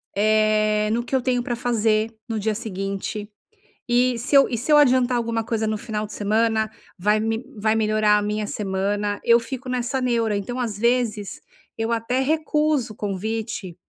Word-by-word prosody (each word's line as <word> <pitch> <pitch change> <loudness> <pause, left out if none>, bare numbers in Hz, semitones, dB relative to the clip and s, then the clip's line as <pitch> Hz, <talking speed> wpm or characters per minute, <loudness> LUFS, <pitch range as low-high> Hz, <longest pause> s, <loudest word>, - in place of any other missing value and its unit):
eh, 215 0 +2
no 235 +2 0
que 265 - -2
eu 260 - +2
tenho 250 -1 0
pra 240 - -2
fazer 225 -2 +1
no 225 -2 -2
dia 215 +1 0
seguinte 200 -1 -4 0.6
e 245 0 +2
se 275 +4 0
eu 275 - +7
e 235 - -2
se 270 +7 -2
eu 300 - +8
adiantar 255 -3 +4
alguma 230 -1 -1
coisa 225 -1 -1
no 215 0 -1
final 215 -2 -4
de 210 - -10
semana, 220 +1 +1 0.3
vai 210 +4 +2
me 225 +2 -1
vai 215 +1 +1
melhorar 215 -1 +3
a - - +1
minha 210 0 -2
semana, 205 0 -2
eu 235 0 +5
fico 260 +2 -7
nessa 250 +1 -1
neura, 230 -4 +1
então, 245 +6 -4
às 220 -5 -2
vezes, 230 -4 0 0.4
eu 225 +1 -1
até 230 +2 0
recuso 300 -4 +1
o - - -18
convite, 210 -2 -4
225 Hz, 180 wpm, -23 LUFS, 210-245 Hz, 0.6 s, eu